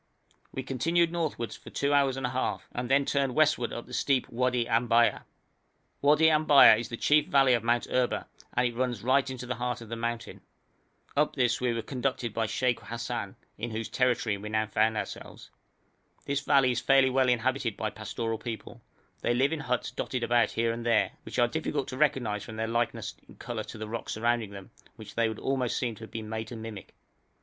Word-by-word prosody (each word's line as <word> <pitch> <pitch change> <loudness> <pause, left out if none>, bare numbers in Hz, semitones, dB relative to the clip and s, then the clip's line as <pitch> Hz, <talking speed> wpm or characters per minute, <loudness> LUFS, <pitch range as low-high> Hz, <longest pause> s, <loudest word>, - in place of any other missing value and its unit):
We 130 - -4
continued 165 +6 +1
northward 155 -9 -2
for - - -11
two 140 +1 0
hours 135 -2 +3
and 135 - -2
a 125 - -2
half, 130 +1 -2
and 120 0 -4
then 140 +1 +4
turned 135 -3 0
westward 155 -6 +3
up 120 - -6
the 125 - -13
steep 135 -1 +1
Wadi 125 0 0
Ambaya. 115 0 +2 0.8
Wadi 150 +3 +5
Ambaya 150 -7 +7
is 120 -1 -5
the 115 - -5
chief 150 +3 +3
valley 135 -2 +4
of 120 -2 +1
Mount 120 +1 +1
Erba, 125 -1 0 0.3
and 125 - +3
it 120 - -4
runs 120 -4 -2
right 130 +2 +3
into 130 -1 -6
the 125 - -2
heart 125 0 -3
of 115 -2 -11
the 115 - -3
mountain. 115 0 -4 0.7
Up 150 +1 +2
this 125 -3 +1
we 125 -1 +1
were 115 -1 -2
conducted 125 -2 -2
by 115 0 0
Sheikh 125 +2 0
Hassan, 115 0 -5 0.2
in 120 +2 -3
whose 110 0 -4
territory 125 -4 +1
we 105 +2 -7
now 110 0 +1
found 110 +1 +1
ourselves. 105 - -7 0.7
This 140 0 0
valley 140 -3 +4
is 120 - 0
fairly 135 -1 +4
well 130 0 +3
inhabited 125 -1 0
by 110 -1 -2
pastoral 110 +2 -4
people; 115 -2 -7 0.4
they 120 - +1
live 135 +5 +2
in 160 - -2
huts 125 -4 -2
dotted 125 -2 -3
about 120 0 +3
here 115 0 0
and 115 0 -6
there, 115 -2 +2
which - - -8
are 120 -1 +4
difficult 145 +1 -2
to 130 - -5
recognise 120 -9 +1
from 110 - -9
their 110 0 -1
likeness 120 +1 -1 0.2
in - - -14
colour 115 -3 -5
to - - -9
the 110 0 -5
rocks 115 +2 -4
surrounding 115 -1 0
them, 100 -1 -11 0.2
which - - -11
they 115 -1 +1
would 110 - -5
almost 130 -2 -1
seem 120 -2 -1
to 110 - -12
have - - -16
been 110 -1 -6
made 110 0 -4
to 120 - -8
mimic. 110 -3 -8
120 Hz, 210 wpm, -28 LUFS, 115-135 Hz, 0.8 s, Ambaya